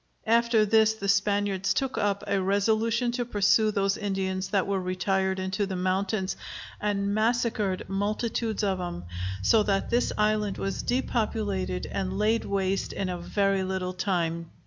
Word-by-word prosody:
After 230 -1 +4
this 220 +1 +4
the 200 -2 -5
Spaniards 200 -1 +1
took 270 -1 -1
up 200 -1 0
a 200 -1 0
resolution 220 +5 +1
to 245 0 -1
pursue 215 -1 +3
those 195 -1 +1
Indians 190 -2 -2
that 195 -2 +1
were 195 -1 -1
retired 190 +1 0
into 190 +2 -1
the 190 - -4
mountains, 190 +2 -1 0.4
and 200 -1 0
massacred 220 -3 0
multitudes 215 +3 -1
of 190 -2 0
'em; 90 - -5 0.4
so 220 - +5
that 200 -2 0
this 240 +1 +2
island 210 -1 +1
was 195 0 -2
depopulated 215 -7 -1
and 190 0 -3
laid 220 +2 +1
waste 195 -1 -1
in 190 -2 -2
a 180 -1 -3
very 195 +2 +1
little 185 -1 -2
time. 170 -3 -1
200 Hz, 150 wpm, -27 LUFS, 190-215 Hz, 0.4 s, so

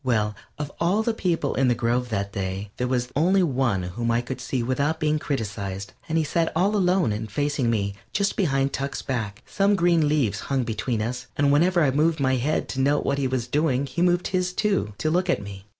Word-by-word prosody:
Well, 110 -5 +1 0.2
of 150 -1 -4
all 185 +6 +2
the 230 - 0
people 170 -9 0
in 135 0 +2
the 120 - +3
grove 120 +2 0
that 100 -2 -2
day 95 +1 -4
there 125 - -1
was 125 -1 0
only 185 +6 +3
one 125 - +1
whom 110 +7 -3
I 115 +1 +2
could 130 +2 -6
see 125 -3 -2
without 140 +6 0
being 155 -1 +1
criticized, 100 -8 -4 0.2
and 160 - +1
he 160 - +3
sat 165 +2 0
all 195 +5 +2
alone 180 - +2
and 105 0 -4
facing 145 -1 0
me, 100 -3 0 0.2
just 200 0 0
behind 135 -7 +1
Tuck's 140 0 -3
back. 110 -6 -3
Some 200 +1 +2
green 170 -4 +3
leaves 130 -10 +1
hung 135 -2 +1
between 115 0 -2
us, 125 +2 -4
and 145 0 +3
whenever 170 +4 +4
I 140 - +3
moved 155 +3 +2
my 130 -1 +2
head 145 +6 0
to 130 - -3
note 145 +2 +2
what 140 0 0
he 135 - +1
was 130 -2 -1
doing 140 0 +1
he 140 +5 -4
moved 175 0 +2
his, 180 -1 0
too, 195 - 0
to 155 - 0
look 180 +2 +1
at - - +2
me. 100 0 -9
135 Hz, 225 wpm, -24 LUFS, 115-165 Hz, 0.2 s, whenever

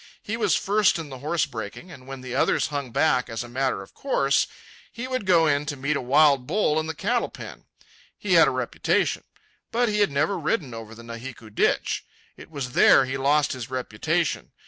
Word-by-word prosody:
He 215 - -3
was 230 - +2
first 205 -1 +2
in 160 -3 -6
the 130 -2 -9
horse 160 +4 0
breaking; 110 - -8
and 130 -5 -13
when 135 -1 -7
the 130 -1 -7
others 130 - +1
hung 140 -3 -4
back, 125 0 +1
as 115 0 -4
a - - -9
matter 125 -4 -1
of - - -18
course, 140 - +1 0.4
he 235 +2 -6
would 255 -6 -3
go 170 -3 +5
in 145 -1 +1
to 145 - -2
meet 140 +3 -1
a - - -1
wild 140 0 +4
bull 160 -4 +1
in 160 - -3
the 160 - -4
cattle 240 +9 0
pen. - - -10 0.5
He - - -1
had - - +7
a - - +2
reputation. - - 0 0.5
But 240 0 +1
he 210 0 0
had 205 - +4
never 155 +7 0
ridden 155 - -1
over 115 0 -9
the 115 - -12
Nahiku 115 -1 -9
Ditch. - - +1 0.3
It - - -13
was 140 -5 -5
there 130 - +6
he 130 +1 -4
lost 145 +2 +2
his 125 -3 -7
reputation. 130 +6 -2
140 Hz, 210 wpm, -25 LUFS, 125-170 Hz, 0.5 s, had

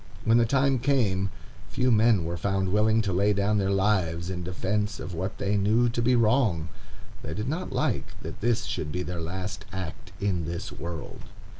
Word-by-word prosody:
When 115 +1 +5
the 115 - +3
time 135 +1 +2
came, 110 -8 +1 0.4
few 125 0 +1
men 110 -4 +4
were 85 +1 -2
found 95 +2 0
willing 110 +3 +3
to 95 -3 -1
lay 100 +3 +3
down 100 +1 +1
their 95 -1 +1
lives 95 -4 +1
in 90 -1 -4
defence 100 +4 -2
of 90 - -6
what 95 +4 -3
they 100 +1 0
knew 110 +5 +3
to 120 0 -1
be 125 +2 +3
wrong; 110 - +2 0.5
they 80 - -5
did 105 +4 -3
not 160 +7 -3
like - - -1
that - - -7
this 115 -1 +1
should 75 -3 -3
be 90 +2 -2
their 90 -1 -4
last 90 +3 -4
act 95 0 -6
in 90 -5 0
this 85 +2 -4
world. 80 +1 -7
100 Hz, 190 wpm, -27 LUFS, 90-115 Hz, 0.5 s, When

